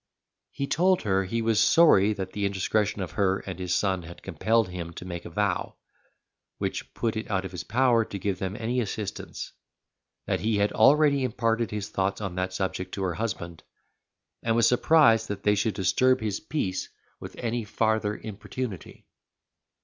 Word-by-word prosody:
He 140 - -3
told 180 +6 +2
her 95 -2 +1
he 115 +4 -2
was 110 -1 +2
sorry 110 - +6
that 95 -2 -5
the 100 0 -1
indiscretion 100 +1 0
of 90 - -6
her 95 -1 +1
and 95 -2 -7
his 90 -1 -1
son 95 -1 +1
had 85 +1 -12
compelled 110 +4 +1
him 85 -2 -6
to 90 - -9
make 85 -1 -6
a - - -6
vow, 100 +4 -1 0.8
which - - -4
put 115 -2 -1
it 110 +2 -4
out 95 -2 0
of 95 - -6
his 90 - -6
power 120 0 +3
to 100 - -6
give 100 0 -2
them 95 +2 -3
any 120 +3 -1
assistance; 105 -2 -5 0.7
that - - 0
he 110 -1 0
had 100 +1 +2
already 140 +4 +5
imparted 115 -2 0
his 105 -1 -4
thoughts 95 +1 -1
on 100 -4 -4
that 90 +1 -2
subject 95 0 -3
to 100 - -3
her 90 -2 0
husband, 85 -6 -4 0.8
and 115 -1 +1
was 115 - +4
surprised 125 -4 +4
that 105 -2 -5
they 105 - +4
should 105 +1 0
disturb 130 +8 +3
his 105 -3 -2
peace 95 -12 -3 0.3
with - - -9
any 120 0 -2
farther 110 0 0
importunity. 110 -1 -7
105 Hz, 180 wpm, -27 LUFS, 95-115 Hz, 0.8 s, sorry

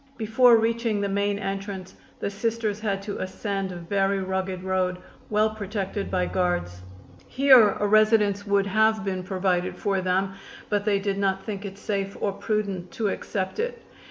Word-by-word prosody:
Before 230 +2 +5
reaching 225 -1 0
the 200 0 -1
main 200 +1 0
entrance 195 -1 -5 0.3
the 200 - -2
Sisters 215 0 -2
had 200 -2 -2
to 205 0 -5
ascend 195 0 -3
a - - -7
very 195 +3 0
rugged 190 -1 -3
road, 185 -1 0 0.3
well 215 +1 +2
protected 200 -1 -4
by 180 -1 +1
guards. 175 - -1 0.5
Here 260 -6 +6
a 210 - +1
residence 210 -1 +3
would 200 -1 +3
have 220 +1 +2
been 185 -1 -2
provided 185 -1 -1
for 195 -3 0
them, 190 +1 0 0.4
but 205 -1 0
they 205 -2 +3
did 195 0 -2
not 195 -1 0
think 205 -1 -5
it 195 0 -7
safe 200 -1 -3
or 200 - 0
prudent 200 -3 -2
to 225 -6 0
accept 190 - -3
it. 480 +1 -3
200 Hz, 165 wpm, -25 LUFS, 190-215 Hz, 0.5 s, Here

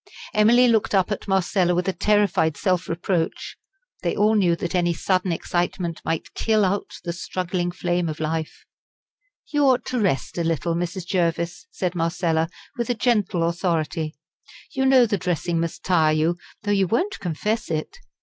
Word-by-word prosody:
Emily 235 +4 +5
looked 220 -3 +2
up 190 +2 +2
at 205 - -4
Marcella 190 -2 +2
with 180 +1 0
a 190 - +1
terrified 205 -8 +2
self 185 -2 0
reproach. 170 0 -2 0.5
They - - -1
all 210 +1 +3
knew 185 -5 +3
that 170 +1 -4
any 175 -2 +1
sudden 185 0 0
excitement 175 0 -2
might 165 - -3
kill 215 -2 +2
out 195 +2 -2
the 170 - -3
struggling 180 0 -2
flame 175 0 -1
of 155 - -5
life. 160 0 -3 0.9
"You 290 -1 +3
ought 260 -2 +3
to 255 - -2
rest 175 - 0
a - - +1
little, 165 +1 0
Mrs. 175 +1 -3
Jervis," 170 - -1
said 180 - -2
Marcella, 165 -1 0 0.3
with 240 0 -1
gentle 205 -8 +1
authority. 165 -2 -1 0.6
"You 265 0 +1
know 260 -2 +6
the 205 -3 -1
dressing 175 -1 -1
must 165 0 -3
tire 160 -4 +3
you, 160 +3 +1 0.3
though 205 - -1
you 195 -2 +3
won't 355 - 0
confess 210 +6 -2
it. 155 - -3
180 Hz, 165 wpm, -23 LUFS, 170-205 Hz, 0.9 s, know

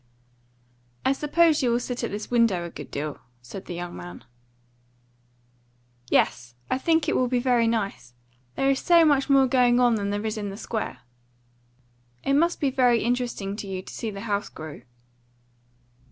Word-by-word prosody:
"I - - +4
suppose 305 +3 +3
you 250 - +2
will 235 0 +2
sit 245 0 -4
at - - -1
this 210 +3 -6
window 230 -8 +2
a 170 - -7
good - - -9
deal," 145 +1 -4 0.2
said 185 +10 -9
the 175 - -6
young 175 0 -6
man. 90 0 -9 1.9
"Yes, 120 0 +1 0.2
I 260 - +1
think 320 +2 +2
it - - +1
will 255 - +2
be 250 0 0
very 245 -2 +2
nice. 200 - -2 0.4
There's 270 0 +2
so 340 -2 +5
much 285 -2 +3
more 275 -1 +6
going 245 -1 +3
on 245 -1 +4
than 200 -2 -1
there 205 +1 -2
is 215 0 -2
in 205 -1 -4
the 195 - -7
Square." 220 0 -4 1.2
"It 275 - +1
must 335 +5 +2
be 280 -4 +1
very 245 -3 +3
interesting 240 -4 -2
to 210 - -6
you 190 -1 -5
to - - -11
see 225 - -4
the 200 -1 -7
house 205 -2 -2
grow." 155 -2 -9
235 Hz, 175 wpm, -25 LUFS, 195-265 Hz, 1.9 s, more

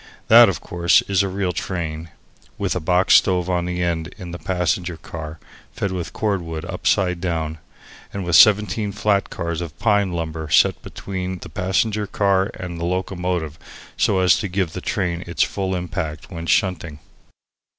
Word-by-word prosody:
That, - - +9
of - - -3
course, 85 -1 +3
is 100 -1 +1
a 100 - 0
real 95 -1 -1
train, 85 -2 -4 0.5
with - - -1
a - - 0
box 90 +3 +3
stove 90 -1 +1
on 90 0 -1
end 85 -2 -1
in 90 -2 -8
the 85 - -7
passenger 90 -1 -1
car, 80 0 -8 0.4
fed 100 - -2
with 90 -2 -4
cordwood 85 -7 -2
upside 90 -1 0
down, 80 -3 -2 0.5
and 100 -2 -5
with 85 -2 +1
seventeen 105 +3 +5
flat 105 -1 +1
cars 85 -1 -3
of 80 -3 -7
pine 105 -3 +2
lumber 80 -2 -4
set - - +4
between 95 -1 -5
the - - -10
passenger 105 +3 0
car 100 0 +1
and 85 -2 -6
the 85 - -2
locomotive 90 -3 -2 0.4
so 95 -2 +2
as 90 - +4
to 105 - -2
give 90 -3 -2
the 90 - -5
train 90 -3 -2
its 85 - +1
full 95 -1 -2
impact 80 -3 -4
when 85 -1 -6
shunting. 85 -7 0
90 Hz, 165 wpm, -21 LUFS, 85-95 Hz, 0.5 s, That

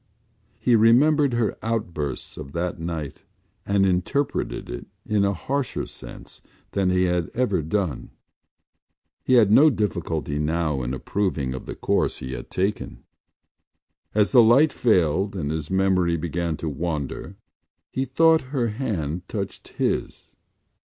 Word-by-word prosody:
He 120 - +3
remembered 135 +5 +5
her 115 -4 0
outburst 85 - -3
of 70 - -9
that 85 0 -2
night 80 -4 -5 0.4
and 100 -1 +3
interpreted 95 +10 -1
it - - -7 0.2
in 105 -2 +1
a 100 - +2
harsher 140 +3 -2
sense - - -11 0.3
than 95 -2 +1
he 90 0 +2
had 90 -3 0
ever 110 -8 +1
done. 80 -2 -2 1.1
He 130 - +1
had 110 -5 +6
no 150 +8 +7
difficulty 85 - -2
now 75 -2 0
in 65 +1 -3
approving 75 -5 -2
of 65 - -7
the - - -5
course - - 0
he 65 - -7
had - - -7
taken. 100 +3 -2 1.1
As 105 -1 +3
the 125 - +8
light 130 +6 +5
failed 95 -2 +2
and 75 -6 -2
his 80 -1 -4
memory 95 -3 +2
began 85 0 -2
to 80 - -5
wander 75 -1 -4 0.6
he 130 - -1
thought 160 +5 +4
her 120 -3 +1
hand 95 - -3
touched 100 -3 -5
his. - - -3
95 Hz, 140 wpm, -24 LUFS, 80-115 Hz, 1.1 s, the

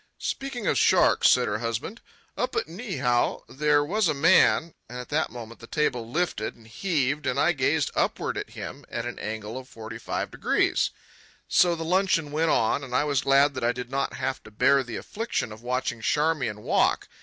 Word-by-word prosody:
"Speaking 270 -5 -4
of - - +2
sharks," - - +5
said - - +4
her 105 +1 -1
husband, 115 - -4 0.3
"up 250 +1 -2
at - - 0
Niihau 165 - -1
there 145 +1 +2
was 210 +5 +1
a 155 - +1
man—" 165 +1 +4 0.2
And 125 - -7
at 125 - -7
that 155 +2 0
moment 115 -1 -9
the 115 - -11
table 125 -6 -1
lifted 160 -7 -2
and 115 - -19
heaved, 145 - -1
and 130 +1 0
I 155 +4 +4
gazed 150 0 +1
upward - - -1
at - - -4
him - - -8
at 115 - -4
an 120 - -6
angle 110 +2 -5
of 130 - -13
forty 110 -1 -8
five - - -3
degrees. - - +1 0.6
So 175 -1 +4
the 165 0 -5
luncheon 170 -4 +1
went 160 +2 +1
on, 115 +3 +2
and 125 -2 -5
I 145 - +3
was 140 -3 +1
glad 140 +1 +4
that 130 -3 -5
I 120 +1 +2
did 125 0 -7
not 140 0 -1
have 130 - -3
to - - -13
bear 135 +6 +3
the 120 -3 -6
affliction 220 - -3
of 110 +1 -10
watching 125 -1 -2
Charmian 130 -4 0
walk. - - +2
140 Hz, 200 wpm, -26 LUFS, 120-160 Hz, 0.6 s, sharks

